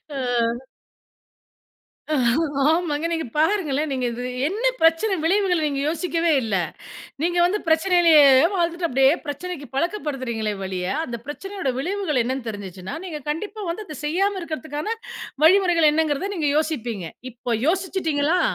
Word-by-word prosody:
அ. - - -3 2.5
ஆமாங்க. 325 -2 0
நீங்க 325 -1 -2
பாருங்களேன். 310 -4 +1
நீங்க 255 -2 -1
இது 245 +1 -5 0.2
என்ன 430 +8 -3 0.2
பிரச்சன 330 +5 +3
விளைவுகள் 360 -2 +2
நீங்க 280 -2 -1
யோசிக்கவே 335 0 0
இல்ல. 215 -3 -1 0.7
நீங்க 345 +1 +1
வந்து 410 +4 0
பிரச்சனையிலேயே 330 -1 +5 0.3
வாழ்ந்துட்டு 340 -1 0
அப்டியே 270 +1 +4
பிரச்சனைக்கு 290 0 -5
பழக்கப்படுத்துகிறீங்களே 270 - -2
ஒழிய! 185 -1 -3 0.2
அந்த 235 -4 -5
பிரச்சனையோட 380 -2 -4
விளைவுகள் 350 -4 -1
என்னனு 255 0 -3
தெரிஞ்சுச்சுன்னா, 190 -3 -7
நீங்க 310 -5 -6
கண்டிப்பா 415 +7 -4
வந்து 425 +5 -5
அத 305 -6 -8
செய்யாம 385 +6 0
இருக்கதற்கான 315 +5 -4 0.5
வழிமுறைகள் 345 -3 +5
என்னங்கறத 320 +5 0
நீங்க 305 -4 0
யோசிப்பீங்க. 240 - -2 0.3
இப்போ 245 +1 -7 0.2
யோசிச்சுட்டீங்களா? 350 -3 +1
320 Hz, 120 wpm, -23 LUFS, 275-360 Hz, 2.5 s, பிரச்சனையிலேயே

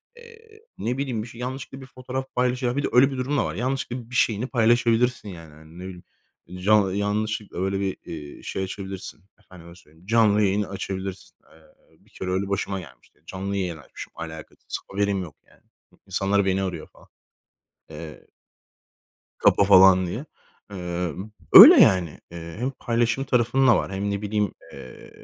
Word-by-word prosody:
eee, 455 -2 -17 0.2
ne 125 +3 -3
bileyim 130 -6 -3
bir 120 - -10
şey 115 +1 -11
yanlışlıkla 130 +1 -6
bir - - -10
fotoğraf 130 +1 -6
paylaşır, 125 0 0
a, 120 - -1
bir 145 - 0
de - - +1
öyle 135 +3 +5
bir 135 - -5
durum 135 +3 -1
da - - +1
var. 80 +2 -4
Yanlışlıkla 125 0 -3
bir 125 - -8
şeyini 115 +1 +1
paylaşabilirsin 120 -1 +1
yani. 80 -4 -11
Hani 80 +1 -17
ne - - -8
bileyim. 95 -1 -9 0.6
Ca 105 -1 +4
yanlışlıkla 105 0 -2
öyle 95 +1 -1
bir, 95 -1 -2
iii, 75 -3 -9
şey 95 - -4
açabilirsin. 95 -1 -7 0.2
Efendime 85 -4 -15
söyleyeyim. 80 0 -21
Canlı 110 -2 +3
yayın 100 +1 +1
açabilirsin. 95 -1 -6 0.2
Eee, 80 -1 -25
bir - - -26
kere 95 - -6
öyle 95 +1 -1
başıma 100 0 -2
gelmişti. 65 -8 -16
Canlı 100 +1 -4
yayın 90 -4 -3
açmışım 70 - -11
alakasız. 80 -2 -8
Haberim 100 -1 0
yok 80 -5 -11
yani. - - -25 0.5
İnsanlar 100 +1 0
beni 95 0 0
arıyor 90 -5 -5
falan, - - -22 0.8
eee 75 0 -10 1.1
kapa 100 - +4
falan 95 -1 +6
diye. 115 - -5 0.5
Emm, 90 +1 -5 0.2
öyle - - +12
yani. 90 -5 +3
Eee, 85 0 -9
hem 125 +3 -1
paylaşım 120 +2 0
tarafında 125 0 +3
var - - -3
hem 100 +1 -2
ne 100 0 -3
bileyim, 105 -1 -1 0.2
eee, 65 - -12
100 Hz, 165 wpm, -24 LUFS, 90-120 Hz, 1.1 s, öyle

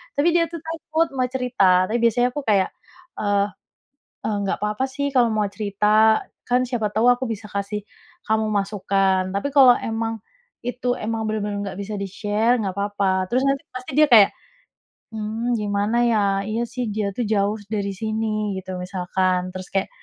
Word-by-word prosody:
Tapi 285 +4 +2
dia, 340 -1 +4
tuh, 335 - -6
takut 325 0 -1
mau 255 - +2
cerita. 235 -8 +3
Tapi 230 - +1
biasanya 235 +1 +3
aku 290 - -3
kayak, 195 -2 +3 0.5
eee 205 -1 +1 0.8
eee, 215 - 0
"Nggak 195 - -1
papa, 210 +4 -1
sih, 280 +2 -3
kalau 240 -2 +5
mau 215 -1 +1
cerita. 210 +2 +3 0.3
Kan, 250 +1 +3
siapa 230 -4 0
tau 225 +3 +3
aku 245 +1 +2
bisa 215 0 -10
kasih 200 +1 -3 0.5
kamu 220 0 +2
masukan. 195 -2 +1
Tapi 200 +8 -1
kalau 260 -3 +8
emang 225 -1 -3 0.4
itu 245 0 -1
emang 220 0 -3
benar-benar 210 -1 -2
nggak 195 -2 -6
bisa 205 +2 -6
di-share, 210 +4 0
nggak 190 -3 -3
papa." 200 -2 0
Terus 255 - +3
nanti 275 0 -1
pasti 255 +1 -7
dia 305 - +7
kayak, 210 -4 +8 0.9
"Mmm, 225 +3 -2
gimana, 205 +1 0
ya? 230 -2 +3 0.3
Iya, 220 +3 -2
sih, 250 -1 -3
dia, 210 -1 -1
tuh, 245 - 0
jauh 205 +1 +1 0.2
dari 200 -1 -1
sini." 215 -1 -2
Gitu 185 0 -6
misalkan. 185 0 -1
Terus 185 0 -7
kayak, 195 0 0
215 Hz, 170 wpm, -22 LUFS, 200-240 Hz, 0.9 s, kalau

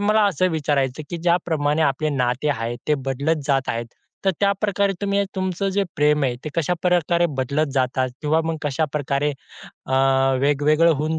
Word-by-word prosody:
मला 210 +1 +3
असं 185 0 +1
विचारायचं, 145 -3 -1
की 175 - -3
ज्याप्रमाणे 160 -3 +1
आपले 155 +1 +1
नाते 130 +1 0
आहेत, 120 -2 -3
ते 150 - +4
बदलत 140 +3 -1
जात 135 -2 +1
आहेत. 115 +1 -2 0.4
तर 195 - +4
त्याप्रकारे 200 0 +1
तुम्ही 200 0 0
अ, 200 - +1
तुमचं 190 +1 -1
जे 200 +1 +1
प्रेम 150 0 +3
आहे, 125 -2 0
ते - - -3
कशाप्रकारे 175 0 +1
बदलत 140 +4 0
जातात, 130 -1 0
किंवा 155 +2 +2
मग 165 0 -2
कशाप्रकारे 145 0 -1 0.5
अ, - - -4 0.5
वेगवेगळं 150 +4 +3
होऊन, 155 +2 -1
150 Hz, 160 wpm, -22 LUFS, 140-175 Hz, 0.5 s, ते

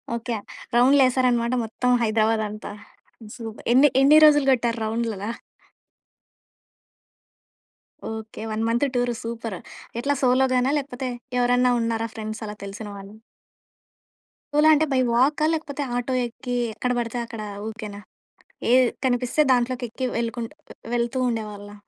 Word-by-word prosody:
Okay 235 0 -3 0.4
.రౌండ్లేసారన్నమాట 255 -2 +4
మొత్తం 250 +3 -2
హైదరాబాద్ 220 0 +2
అంతా. 210 +1 -7 0.6
Super! 225 -2 -9
ఎన్ని 280 +3 +6
ఎన్ని 300 +3 +7
రోజులు 295 -2 +5
కొట్టారు 235 -2 +1
రౌండ్లలా? 220 -1 -2 2.8
ఓకే. 220 0 -7
1 215 +1 -1
month 240 +4 +2
tour 245 0 +1
super! 230 -3 -5 0.4
ఎట్లా 285 +2 +1
సోలో‌గాన, 255 0 +3
లేకపోతే 265 -2 -4 0.3
ఎవరన్నా 245 0 +3
ఉన్నారా 230 0 -1
ఫ్రెండ్స్ 220 0 -5
అలా 210 - -6
తెలిసిన 205 +2 -7
వాళ్ళు? 195 +2 -11 1.4
సోలో 300 +1 +5
అంటే 305 +1 +3
బై 265 - +2
వాకా 280 +6 +3
లేకపోతే 305 -3 -3
ఆటో 245 +1 -2
ఎక్కి 245 +1 -5 0.2
ఎక్కడ 250 +3 -2
పడితే 240 0 -2
అక్కడ 225 -2 -8 0.2
ఊరికేనా, 215 -2 -7 0.7
ఏ - - +6 0.3
కనిపిస్తే 250 +3 +1
దాంట్లోకి 250 0 +1
ఎక్కి 255 +3 -4
వెళ్ళకుంటు 230 +1 -3 0.4
వెళ్తూ 240 +2 0
ఉండేవాళ్ళా? 210 -2 -5
240 Hz, 120 wpm, -24 LUFS, 225-255 Hz, 2.8 s, ఎన్ని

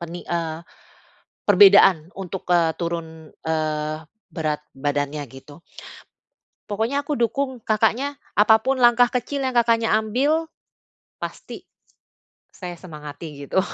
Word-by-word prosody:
peni 170 +1 -7
eee, 165 -1 -2 0.9
perbedaan 190 - +6
untuk, 190 -1 -7
eee, 170 -2 +4
turun, 165 -2 -5 0.2
eee, 155 -1 -1 0.3
berat 155 -3 -2
badannya, 145 +1 -2
gitu. 145 +4 -13 1.1
Pokoknya 230 +8 -1
aku 295 - 0
dukung 260 +2 -1
Kakaknya, 240 +6 0 0.2
apa 220 +1 +6
pun 265 0 0
langkah 240 +1 +6
kecil 270 +3 -2
yang 255 - -3
Kakaknya 230 -2 +3
ambil, 280 +9 0 0.7
pasti - - -8 0.9
saya 180 -2 -8
semangati 150 -3 -9
gitu. 190 - +2
180 Hz, 110 wpm, -22 LUFS, 155-240 Hz, 1.1 s, perbedaan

